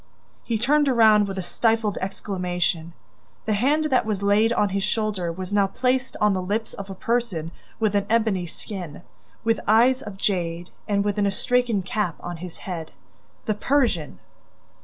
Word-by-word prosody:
He 230 Hz, -, -1 dB
turned 285 Hz, +5 st, +3 dB
around, 220 Hz, -4 st, +5 dB
with 195 Hz, -1 st, -5 dB
a 190 Hz, -, -2 dB
stifled 225 Hz, +2 st, 0 dB
exclamation. 180 Hz, -3 st, -2 dB, 0.5 s
The 220 Hz, -, +1 dB
hand 280 Hz, +9 st, +2 dB
that 255 Hz, -, +4 dB
was 210 Hz, -2 st, -2 dB
laid 210 Hz, +3 st, +4 dB
on 210 Hz, -3 st, +2 dB
his 195 Hz, +1 st, -1 dB
shoulder 205 Hz, -5 st, -1 dB
was 185 Hz, +3 st, -6 dB
now 200 Hz, -1 st, +4 dB
placed 255 Hz, +5 st, -1 dB
on 210 Hz, -1 st, +3 dB
the 185 Hz, -, -1 dB
lips 210 Hz, +5 st, -2 dB
of 200 Hz, 0 st, -8 dB
a 195 Hz, -, -6 dB
person 205 Hz, -8 st, -1 dB, 0.3 s
with 215 Hz, -2 st, +1 dB
an 200 Hz, 0 st, +1 dB
ebony 215 Hz, -6 st, +1 dB
skin, 175 Hz, -3 st, -7 dB, 0.4 s
with 225 Hz, -1 st, +2 dB
eyes 245 Hz, +5 st, +5 dB
of 205 Hz, -6 st, -8 dB
jade 175 Hz, -3 st, -1 dB, 0.2 s
and 200 Hz, -1 st, +1 dB
with 205 Hz, 0 st, 0 dB
an 200 Hz, -, +3 dB
astrakhan 230 Hz, +1 st, +1 dB
cap 190 Hz, -3 st, -1 dB
on 175 Hz, -1 st, -6 dB
his 175 Hz, 0 st, -8 dB
head: 165 Hz, -4 st, -5 dB, 0.5 s
the 215 Hz, -, +1 dB
Persian! 220 Hz, -, 0 dB
205 Hz, 170 wpm, -24 LUFS, 185-225 Hz, 0.5 s, around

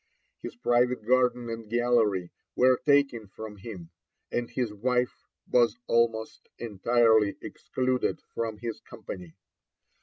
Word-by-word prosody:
His -, -, -7 dB
private 125 Hz, -, +1 dB
garden 125 Hz, 0 st, +2 dB
and 115 Hz, -1 st, -7 dB
gallery 115 Hz, -6 st, +2 dB, 0.2 s
were 130 Hz, 0 st, +4 dB
taken 140 Hz, -6 st, +3 dB
from 105 Hz, +1 st, -9 dB
him, 95 Hz, -5 st, -9 dB, 0.4 s
and 120 Hz, -1 st, -2 dB
his 120 Hz, -5 st, -2 dB
wife 125 Hz, +3 st, -1 dB, 0.2 s
was 120 Hz, -2 st, +3 dB
almost 115 Hz, -1 st, 0 dB
entirely 110 Hz, -1 st, +3 dB
excluded 130 Hz, 0 st, -2 dB
from 115 Hz, -2 st, -3 dB
his 115 Hz, 0 st, -5 dB
company. 90 Hz, -3 st, -9 dB
115 Hz, 115 wpm, -28 LUFS, 105-125 Hz, 0.4 s, were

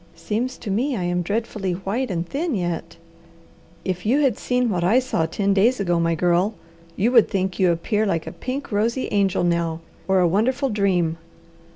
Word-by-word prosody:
"Seems 215 Hz, +9 st, -3 dB
to 210 Hz, -, -5 dB
me 255 Hz, +7 st, 0 dB
I 180 Hz, -, -2 dB
am 175 Hz, 0 st, 0 dB
dreadfully 200 Hz, 0 st, -2 dB
white 205 Hz, +8 st, -2 dB
and 170 Hz, -2 st, -2 dB
thin 305 Hz, -, -2 dB
yet!" 170 Hz, -2 st, -3 dB, 0.9 s
"If 180 Hz, -1 st, -2 dB
you 255 Hz, +7 st, +2 dB
had 265 Hz, -7 st, +3 dB
seen 250 Hz, 0 st, 0 dB
what 175 Hz, -3 st, -1 dB
I 200 Hz, +8 st, +4 dB
saw 250 Hz, -11 st, 0 dB
ten 200 Hz, +4 st, 0 dB
days 225 Hz, +6 st, +3 dB
ago, 175 Hz, -3 st, +1 dB
my 165 Hz, 0 st, +1 dB
Girl, 180 Hz, +5 st, +1 dB, 0.4 s
you 225 Hz, +6 st, +1 dB
would 235 Hz, -4 st, +5 dB
think 190 Hz, -2 st, -2 dB
you 185 Hz, -2 st, +4 dB
appear 210 Hz, +6 st, 0 dB
like 165 Hz, -4 st, -1 dB
a -, -, -6 dB
pink, 265 Hz, +2 st, -5 dB
rosy 230 Hz, +5 st, 0 dB
angel 195 Hz, -3 st, +1 dB
now, 170 Hz, -2 st, 0 dB, 0.3 s
or 190 Hz, 0 st, +3 dB
a 180 Hz, -, +4 dB
wonderful 250 Hz, -, +1 dB
dream." 180 Hz, -6 st, +1 dB
195 Hz, 190 wpm, -22 LUFS, 175-235 Hz, 0.9 s, would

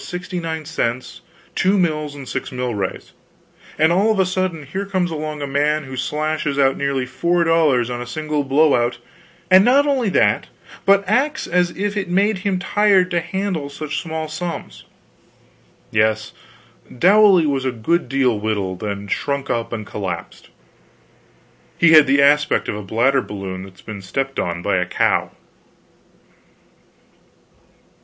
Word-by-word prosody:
6 -, -, -10 dB
(sixty 180 Hz, 0 st, -5 dB
nine 160 Hz, -2 st, -4 dB
cents, 125 Hz, -5 st, -3 dB, 0.3 s
two 190 Hz, +2 st, +2 dB
mills 155 Hz, -5 st, -1 dB
and 135 Hz, -2 st, -9 dB
six -, -, -4 dB
milrays), 120 Hz, -7 st, -4 dB, 0.7 s
and 160 Hz, +1 st, +4 dB
all 200 Hz, +5 st, +3 dB
of 215 Hz, -, 0 dB
a 190 Hz, -, +4 dB
sudden 185 Hz, -4 st, -2 dB
here 190 Hz, +8 st, -4 dB
comes 185 Hz, -3 st, -1 dB
along 155 Hz, -1 st, -4 dB
a -, -, -1 dB
man 150 Hz, +2 st, 0 dB
who 130 Hz, -1 st, -8 dB
slashes 150 Hz, +1 st, -2 dB
out 135 Hz, -1 st, +3 dB
nearly 140 Hz, -2 st, -1 dB
four 170 Hz, +7 st, 0 dB
dollars 155 Hz, -8 st, +3 dB
on 120 Hz, 0 st, -4 dB
a 120 Hz, -, -6 dB
single 150 Hz, +2 st, -2 dB
blow 140 Hz, +3 st, +3 dB
out; 120 Hz, 0 st, +1 dB, 0.5 s
and 185 Hz, +1 st, +8 dB
not 270 Hz, +5 st, +4 dB
only 265 Hz, -7 st, +1 dB
that, -, -, +2 dB, 0.4 s
but 200 Hz, 0 st, +4 dB
acts 290 Hz, +4 st, +1 dB
as 180 Hz, 0 st, +1 dB
if 205 Hz, +1 st, -2 dB
it 195 Hz, -3 st, -3 dB
made 200 Hz, +2 st, +1 dB
him 195 Hz, -1 st, -1 dB
tired 195 Hz, -1 st, +2 dB
to 175 Hz, -, +2 dB
handle 190 Hz, -6 st, -3 dB
such 150 Hz, +1 st, -4 dB
small 160 Hz, -2 st, -4 dB
sums. 165 Hz, +3 st, -6 dB, 1.1 s
Yes, 110 Hz, 0 st, +1 dB, 0.7 s
Dowley 195 Hz, -, +5 dB
was 140 Hz, -3 st, 0 dB
a 130 Hz, -, 0 dB
good 125 Hz, +7 st, -1 dB
deal 130 Hz, -5 st, +1 dB
wilted, 100 Hz, -4 st, -2 dB
and 100 Hz, 0 st, -6 dB
shrunk 140 Hz, 0 st, -2 dB
up 115 Hz, -1 st, -2 dB
and 110 Hz, -3 st, -5 dB
collapsed; 95 Hz, -5 st, -6 dB, 1.3 s
he 170 Hz, -1 st, +5 dB
had 155 Hz, -3 st, +8 dB
the 140 Hz, +1 st, +4 dB
aspect 145 Hz, +1 st, +3 dB
of -, -, -2 dB
a 105 Hz, -, -5 dB
bladder 120 Hz, +7 st, +1 dB
balloon 95 Hz, -4 st, -6 dB
that's 95 Hz, 0 st, -13 dB
been 105 Hz, -3 st, -8 dB
stepped 135 Hz, +8 st, -3 dB
on 85 Hz, 0 st, -3 dB
by 100 Hz, -1 st, +1 dB
a 90 Hz, -, 0 dB
cow. -, -, +1 dB
150 Hz, 160 wpm, -20 LUFS, 125-180 Hz, 1.3 s, and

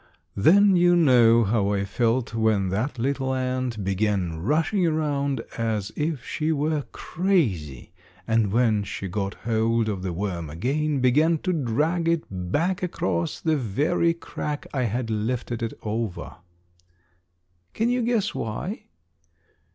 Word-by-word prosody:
Then 195 Hz, -, +5 dB
you 175 Hz, 0 st, +5 dB
know 120 Hz, -8 st, +5 dB
how 100 Hz, -1 st, +1 dB
I 100 Hz, 0 st, 0 dB
felt 115 Hz, +4 st, 0 dB
when 110 Hz, -4 st, +1 dB
that 115 Hz, +9 st, -2 dB
little 130 Hz, +2 st, -1 dB
ant 130 Hz, -4 st, -2 dB
began 95 Hz, -4 st, -1 dB
rushing 165 Hz, -, +1 dB
around 140 Hz, -4 st, 0 dB, 0.2 s
as 110 Hz, -3 st, -1 dB
if 150 Hz, -4 st, -2 dB
she 155 Hz, 0 st, -1 dB
were 150 Hz, -1 st, 0 dB
crazy, 105 Hz, -, -1 dB, 0.4 s
and 110 Hz, -3 st, +2 dB
when 110 Hz, -2 st, +2 dB
she 100 Hz, 0 st, -5 dB
got 100 Hz, +1 st, -3 dB
hold 115 Hz, 0 st, 0 dB
of 100 Hz, -4 st, -2 dB
the 95 Hz, -1 st, -3 dB
worm 85 Hz, -3 st, -3 dB
again, 140 Hz, -, -1 dB
began 150 Hz, +6 st, +3 dB
to 185 Hz, -, 0 dB
drag 155 Hz, +5 st, 0 dB
it 165 Hz, -1 st, +1 dB
back 145 Hz, -, -1 dB
across 90 Hz, -, -2 dB
the 160 Hz, -1 st, +1 dB
very 150 Hz, -, +1 dB
crack 150 Hz, -3 st, -5 dB
I 130 Hz, -3 st, 0 dB
had 115 Hz, +1 st, -2 dB
lifted 115 Hz, +2 st, -2 dB
it 115 Hz, -, -2 dB
over. 110 Hz, -2 st, -4 dB, 1.4 s
Can 230 Hz, +2 st, +1 dB
you 250 Hz, 0 st, +1 dB
guess 230 Hz, -3 st, 0 dB
why? 150 Hz, -, -4 dB
120 Hz, 135 wpm, -25 LUFS, 105-155 Hz, 1.4 s, Then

